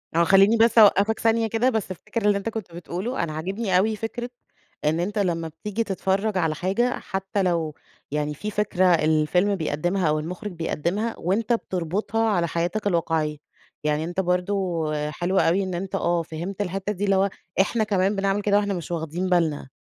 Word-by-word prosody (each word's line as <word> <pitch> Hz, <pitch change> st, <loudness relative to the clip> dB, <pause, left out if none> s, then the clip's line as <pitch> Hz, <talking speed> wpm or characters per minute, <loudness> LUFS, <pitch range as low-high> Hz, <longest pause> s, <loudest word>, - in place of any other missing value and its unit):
آه، 170 Hz, -, +5 dB
خلّيني 195 Hz, +5 st, +5 dB
بس 230 Hz, +1 st, +4 dB
أوقفك 210 Hz, 0 st, +6 dB
ثانية 225 Hz, 0 st, +2 dB
كده 230 Hz, +4 st, +2 dB
بس 220 Hz, -6 st, -2 dB
الفكرة 210 Hz, +4 st, -3 dB
اللي 205 Hz, -1 st, +4 dB
أنت 200 Hz, +3 st, -3 dB
كنت 220 Hz, -5 st, -6 dB
بتقوله، 180 Hz, +8 st, -3 dB
أنا 155 Hz, -, -3 dB
عاجبني 190 Hz, +5 st, -1 dB
أوي 215 Hz, +4 st, +2 dB
فكرة 240 Hz, +3 st, -5 dB, 0.6 s
إن 155 Hz, +3 st, +2 dB
أنت 205 Hz, +4 st, -1 dB
لمّا 170 Hz, -4 st, 0 dB
بتيجي 210 Hz, +8 st, -3 dB
تتفرّج 195 Hz, 0 st, -1 dB
على 160 Hz, -3 st, +1 dB
حاجة 195 Hz, +9 st, 0 dB
حتّى 195 Hz, 0 st, -2 dB
لو 165 Hz, -4 st, 0 dB, 0.4 s
يعني 150 Hz, 0 st, -1 dB
في 210 Hz, +8 st, -5 dB
فكرة 205 Hz, -3 st, +1 dB
الفيلم 170 Hz, +3 st, +3 dB
بيقدمها 175 Hz, +3 st, -1 dB
أو 155 Hz, 0 st, +1 dB
المخرج 180 Hz, +7 st, -5 dB
بيقدمها، 175 Hz, +6 st, -2 dB
وأنت 210 Hz, +7 st, 0 dB
بتربطها 205 Hz, +3 st, -1 dB
على 175 Hz, -4 st, +1 dB
حياتك 175 Hz, +6 st, -1 dB
الواقعيّة، 160 Hz, -4 st, 0 dB, 0.5 s
يعني 150 Hz, 0 st, 0 dB
أنت 175 Hz, +3 st, -4 dB
برضو 180 Hz, -1 st, 0 dB, 0.3 s
حلوة 180 Hz, +4 st, +1 dB
أوي 195 Hz, +4 st, +2 dB
إن 185 Hz, -1 st, -4 dB
أنت 190 Hz, +2 st, -4 dB
آه، 170 Hz, -2 st, +1 dB
فهمت 170 Hz, +5 st, -5 dB
الحتّة 195 Hz, +2 st, -2 dB
دي 205 Hz, +2 st, -2 dB
اللي 195 Hz, -, +3 dB
هو 195 Hz, +1 st, +3 dB, 0.3 s
إحنا 220 Hz, +3 st, +1 dB
كمان 200 Hz, -1 st, +1 dB
بنعمل 195 Hz, +1 st, 0 dB
كده 205 Hz, 0 st, +3 dB
وإحنا 205 Hz, -1 st, 0 dB
مش 175 Hz, -2 st, -5 dB
واخدين 170 Hz, +2 st, -2 dB
بالنا. 160 Hz, -6 st, +1 dB
190 Hz, 180 wpm, -24 LUFS, 170-210 Hz, 0.6 s, أوقفك